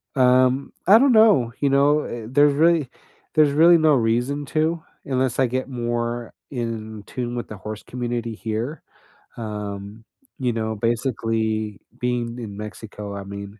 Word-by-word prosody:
Um, 130 +1 +3
I 205 - +9
don't 275 0 +4
know, 210 - +5
you 140 - +2
know. 145 +2 +4
Eh, 115 -2 -6
there 145 +3 +5
really 155 -1 +3 0.4
there's 150 -2 +4
really 165 +4 +6
no 155 -1 +4
reason 125 +5 0
to, 160 +2 0 0.2
unless 130 -1 0
I 130 - +4
get 130 +2 -2
more 120 -1 -3 0.2
in 110 -4 -5
tune 120 -1 -4
with 120 - -4
the 105 - -8
horse 105 +2 -7
community 120 -2 -4
here. 115 +8 -4 0.5
Um, 105 -1 -6 0.4
you 125 -2 +1
know, 110 -1 -2
basically, 110 -2 -1 0.2
being 120 -1 -2
in 105 -4 -7
Mexico, 105 -1 -7
I 100 - -6
mean, 100 +1 -8
120 Hz, 150 wpm, -23 LUFS, 110-140 Hz, 0.5 s, I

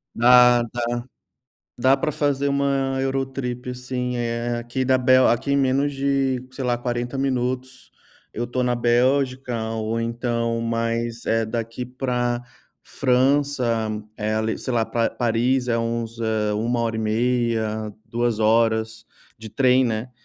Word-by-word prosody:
Dá, 125 0 +6
dá. 120 - -3 1.0
Dá 130 +2 +4
pra 150 - -1
fazer 140 -2 0
uma 140 -1 0
Eurotrip 130 -2 -3
sim, 125 0 -3
eh, 120 0 -2
aqui 120 +2 -3
da 130 0 +3
Bel 130 0 +5
aqui 120 +4 0
em - - +3
menos 135 +2 +1
de, 135 -2 0
sei 130 0 -6
lá, 120 -1 +1
40 120 +1 -3
minutos 130 -1 -2 0.4
eu 120 - -3
estou 125 +1 -2
na 125 0 +1
Bélgica, 125 +1 +1 0.2
ou 110 +1 -2
então 115 0 -1
mais, 115 0 -2
eh, 115 0 +2
daqui 115 +2 -4
para 125 -1 -2 0.4
França 130 -3 +1 0.3
é 110 0 -1
ali 110 0 -1
sei, 130 - -4
lá 115 -2 +1
Pa 115 -1 0
Paris 125 +2 0
é 115 - +2
uns, 115 0 -3
hã, 110 -2 0
1,5 115 0 0
hora, 105 -1 -7
2 120 -1 -1
horas 110 0 +1 0.3
de 110 0 -9
trem, 130 +2 +3
né. 115 +1 -2
120 Hz, 140 wpm, -23 LUFS, 115-130 Hz, 1.0 s, Dá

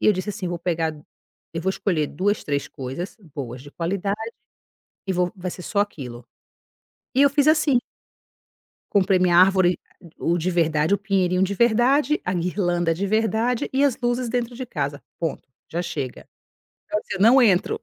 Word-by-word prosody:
e - - +1
eu 215 - +7
disse 185 +2 -3
assim: 195 -3 -4
"Vou 175 -1 -3
pegar, 165 -2 -1 0.6
eu 165 - -2
vou 190 - 0
escolher 170 -6 0
2, 205 +7 0
3 145 -1 -1
coisas 135 - -6 0.2
boas, 125 -3 -6
de 145 - -12
qualidade, 195 +5 -2 0.9
e 190 - 0
vou 180 +1 0
vai 180 0 -4
ser 180 - -8
só 200 - -3
aquilo". 125 - -4 0.9
E 265 - +3
eu 280 - +7
fiz 290 +1 +3
assim. 305 -5 +4 1.1
Comprei 190 -2 +3
minha 175 -1 +4
árvore, 185 -1 +5 0.4
a - - -10
o 170 +1 +2
de 175 +3 -1
verdade, 160 0 +2
o - - -5
pinheirinho 190 -2 +1
de 195 +1 0
verdade, 240 +7 +3
a 180 - 0
guirlanda 175 -1 0
de 195 +5 -2
verdade 225 +3 +1
e 270 +2 +2
as 275 -4 +3
luzes 240 0 0
dentro 240 0 -2
de 255 +1 -5
casa. 145 - -3 0.2
Ponto, 165 -3 -3 0.3
já 170 +2 -2
chega. 145 -7 -5 0.6
Quer 210 - +1
dizer, 190 - -6
não 245 +6 +7
entro, 195 -7 +3
185 Hz, 180 wpm, -23 LUFS, 170-220 Hz, 1.1 s, eu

